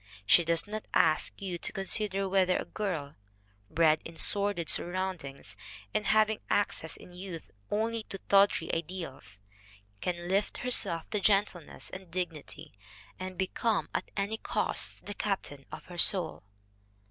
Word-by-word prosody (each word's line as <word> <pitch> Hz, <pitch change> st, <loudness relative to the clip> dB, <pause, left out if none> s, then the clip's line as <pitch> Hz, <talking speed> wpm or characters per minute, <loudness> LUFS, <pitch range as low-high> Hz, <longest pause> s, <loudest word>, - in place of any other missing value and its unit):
She 170 Hz, -, +6 dB
does 165 Hz, 0 st, +1 dB
not 215 Hz, +1 st, -5 dB
ask 155 Hz, -1 st, +3 dB
you 180 Hz, -3 st, -3 dB
to -, -, -1 dB
consider 195 Hz, 0 st, 0 dB
whether 185 Hz, -1 st, +3 dB
a -, -, -3 dB
girl, 165 Hz, -9 st, -3 dB, 0.6 s
bred 155 Hz, -1 st, +4 dB
in 165 Hz, -, -9 dB
sordid 200 Hz, 0 st, +1 dB
surroundings 175 Hz, -, -2 dB, 0.4 s
and 210 Hz, -, 0 dB
having 215 Hz, 0 st, +4 dB
access 180 Hz, -5 st, 0 dB
in 180 Hz, -, -13 dB
youth 180 Hz, -2 st, -8 dB, 0.2 s
only 225 Hz, +2 st, 0 dB
to 195 Hz, -, -4 dB
tawdry 195 Hz, -4 st, +4 dB
ideals, 165 Hz, -, -5 dB, 0.6 s
can 175 Hz, -1 st, -2 dB
lift 195 Hz, +3 st, +1 dB
herself 170 Hz, -9 st, +2 dB
to 210 Hz, -, +1 dB
gentleness 195 Hz, -5 st, +1 dB
and 185 Hz, -1 st, -9 dB
dignity 165 Hz, -4 st, -5 dB, 0.5 s
and 185 Hz, 0 st, -5 dB
become, 205 Hz, +3 st, 0 dB
at -, -, -2 dB
any 200 Hz, +3 st, 0 dB
cost, -, -, 0 dB
the 205 Hz, -, -4 dB
captain 190 Hz, -10 st, -3 dB
of -, -, -8 dB
her 175 Hz, -1 st, -8 dB
soul. 175 Hz, -2 st, +4 dB
185 Hz, 140 wpm, -31 LUFS, 165-200 Hz, 0.6 s, She